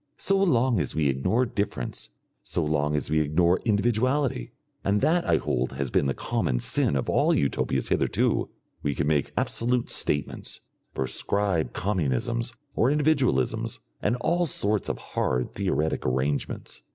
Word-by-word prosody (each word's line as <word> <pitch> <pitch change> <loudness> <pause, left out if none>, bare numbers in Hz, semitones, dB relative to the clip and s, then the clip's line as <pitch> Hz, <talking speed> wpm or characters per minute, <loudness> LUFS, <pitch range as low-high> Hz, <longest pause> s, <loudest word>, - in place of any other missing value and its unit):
So 195 - +1
long 130 - +3
as 75 - -2
we 75 -3 +2
ignore 90 - +1
difference, 100 - -4 0.3
so 85 - -2
long 75 -1 +1
as 75 - -2
we 80 - +3
ignore 85 +4 +3
individuality, 120 +4 +1 0.3
and 100 +1 +2
that 170 +2 +2
I - - +5
hold 65 +1 -1
has 70 -3 -3
been 70 - +2
the 65 - -1
common - - -1
sin - - +1
of 65 - -1
all - - +3
Utopias 70 - 0
hitherto, - - +1 0.3
we 70 -1 -1
can 80 - 0
make 75 -2 +1
absolute 120 +1 0
statements, 70 -2 -2 0.4
prescribe 85 +4 0
communisms 105 - -1 0.2
or 120 - +3
individualisms, 140 - +1 0.2
and 105 - +1
all 175 +4 +2
sorts 105 -6 0
of - - -2 0.2
hard 65 0 0
theoretic 90 -5 0
arrangements. 65 -1 -2
90 Hz, 145 wpm, -26 LUFS, -, 0.4 s, I